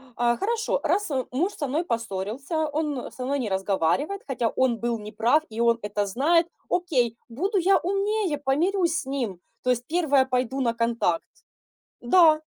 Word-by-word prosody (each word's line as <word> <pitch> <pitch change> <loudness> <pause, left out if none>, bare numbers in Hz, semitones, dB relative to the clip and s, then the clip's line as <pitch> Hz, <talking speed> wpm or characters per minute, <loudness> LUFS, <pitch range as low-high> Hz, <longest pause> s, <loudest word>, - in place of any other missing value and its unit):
а, 240 0 +2
хорошо, 455 +3 0
раз, 415 -5 0
а, 260 -3 -1
муж 345 +11 0
со 290 - -3
мной 300 +6 0
поссорился, 230 - -2
он 295 -3 -3
со 250 - -6
мной 280 +2 0
не 230 - -2
разговаривает, 195 - 0
хотя 245 -4 0
он 245 -2 +1
был 235 -1 -1
неправ 220 +8 +1
и 220 0 -7
он 235 0 +3
это 205 0 -1
знает, 315 - +2 0.2
окей, 255 -11 +1
буду 380 - -1
я 380 +2 +4
умнее, 395 -2 0
помирюсь 330 +5 +1
с - - -6
ним, 250 -9 -3 0.2
то 250 - +2
есть 245 0 -1
первая 300 -6 +3
пойду 260 +1 -1
на 235 -3 +1
контакт". 230 -7 0 0.8
Да, 310 +3 +5
265 Hz, 165 wpm, -25 LUFS, 235-330 Hz, 0.8 s, Да